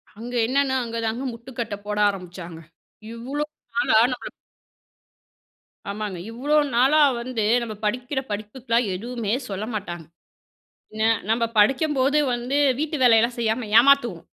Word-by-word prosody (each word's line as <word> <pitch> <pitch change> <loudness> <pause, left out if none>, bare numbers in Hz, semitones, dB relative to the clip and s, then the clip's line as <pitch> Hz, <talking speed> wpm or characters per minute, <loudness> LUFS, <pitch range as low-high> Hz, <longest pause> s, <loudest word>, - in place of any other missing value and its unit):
அங்க 235 +4 -8
என்னென்னா, 270 +1 +1
அங்கதாங்க 230 +1 -3
முட்டுக்கட்ட 235 -2 -6
போட 210 0 -3
ஆரம்புச்சாங்க. 180 -3 -8 0.5
இவ்ளோ 260 +6 -4 0.3
நாளா 280 -6 +3 0.2
நம்மள 250 - -7 1.6
ஆமாங்க. 205 -2 -4
இவ்ளோ 275 +6 -1 0.2
நாளா 265 +5 +4 0.2
வந்து 240 -2 -3 0.2
நம்ம 225 -2 -5
படிக்கிற 250 +5 -1
படிப்புக்குலாம் 230 +3 -1
எதுவுமே 230 +1 -3 0.2
சொல்ல 200 +1 -4
மாட்டாங்க. 175 -5 -5 0.9
என்ன 220 0 0 0.2
நம்ம 230 +1 +2 0.2
படிக்கும்போது 270 +4 +3 0.2
வந்து 245 +3 -2 0.2
வீட்டு 310 0 -2
வேலையெல்லாம் 235 0 +4
செய்யாம 225 0 -1
ஏமாத்துவோம். 240 -9 +3
235 Hz, 115 wpm, -23 LUFS, 210-260 Hz, 1.6 s, நாளா